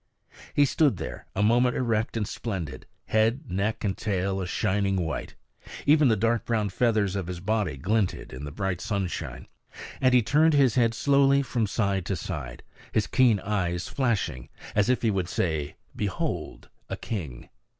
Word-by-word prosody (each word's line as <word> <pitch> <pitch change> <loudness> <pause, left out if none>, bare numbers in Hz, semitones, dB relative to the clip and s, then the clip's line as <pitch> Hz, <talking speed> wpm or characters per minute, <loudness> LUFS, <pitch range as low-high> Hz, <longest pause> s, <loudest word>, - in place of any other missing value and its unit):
He 145 - +6
stood 140 - +2
there - - -7
a 100 - +1
moment 120 +3 +3
erect 115 -2 0
and 105 -3 -1
splendid, 85 - -5 0.2
head, 115 +6 +2
neck, 105 +4 -1
and 100 -3 0
tail 95 -2 -1
a 90 - -3
shining 100 0 0
white; 80 -5 -3 0.5
even 150 0 +5
the 115 - +4
dark 115 +3 +1
brown 110 -3 0
feathers 105 -2 +1
of 95 -4 -3
his 90 -1 -5
body 100 -6 -1
glinted 100 +2 -1
in 65 +2 -7
the 75 - -5
bright 95 +1 -2
sunshine. 100 -4 -3 0.5
And 130 -1 +4
he 125 - +5
turned 155 +5 +4
his 135 -5 +4
head 115 -3 +2
slowly 140 +1 +4
from 115 -4 -1
side 100 -4 0
to 95 - 0
side, 70 -11 -6 0.3
his 110 - +1
keen 120 -6 +3
eyes 90 -4 -1
flashing, 100 - -1 0.2
as 105 +2 +2
if 125 - +1
he 115 - +3
would 95 -3 -1
say, 80 -4 -1 0.2
"Behold, 100 -3 -3 0.2
a - - -3
king!" 75 - -6
105 Hz, 170 wpm, -27 LUFS, 95-120 Hz, 0.5 s, He